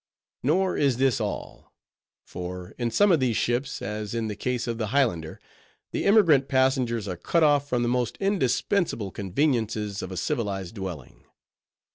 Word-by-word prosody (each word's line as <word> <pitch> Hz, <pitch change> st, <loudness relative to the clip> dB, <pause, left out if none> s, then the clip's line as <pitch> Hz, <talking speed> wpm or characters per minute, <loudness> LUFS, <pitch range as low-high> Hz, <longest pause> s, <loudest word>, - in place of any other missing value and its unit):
Nor 180 Hz, +8 st, +1 dB
is 140 Hz, -5 st, +2 dB
this 130 Hz, -2 st, +2 dB
all: -, -, -6 dB, 0.5 s
for 90 Hz, 0 st, -7 dB
in 120 Hz, -1 st, 0 dB
some 205 Hz, -, +4 dB
of 165 Hz, -, +4 dB
these 125 Hz, -4 st, +1 dB
ships, 120 Hz, +3 st, -1 dB
as 105 Hz, +1 st, -4 dB
in 115 Hz, -1 st, -1 dB
the 105 Hz, -, -4 dB
case 125 Hz, +3 st, -2 dB
of 115 Hz, -1 st, -3 dB
the 110 Hz, -, -1 dB
Highlander, 105 Hz, -, 0 dB, 0.5 s
the -, -, -2 dB
emigrant 170 Hz, -10 st, +5 dB
passengers 130 Hz, -4 st, +1 dB
are 90 Hz, -, -3 dB
cut 160 Hz, -, +1 dB
off 145 Hz, -1 st, +3 dB
from 120 Hz, -1 st, +1 dB
the -, -, 0 dB
most 125 Hz, -1 st, 0 dB
indispensable 175 Hz, -, 0 dB
conveniences 105 Hz, -, -1 dB
of 95 Hz, -, -6 dB
a 95 Hz, -, -5 dB
civilized 95 Hz, 0 st, -2 dB
dwelling. 95 Hz, -, -8 dB
120 Hz, 160 wpm, -26 LUFS, 105-140 Hz, 0.5 s, emigrant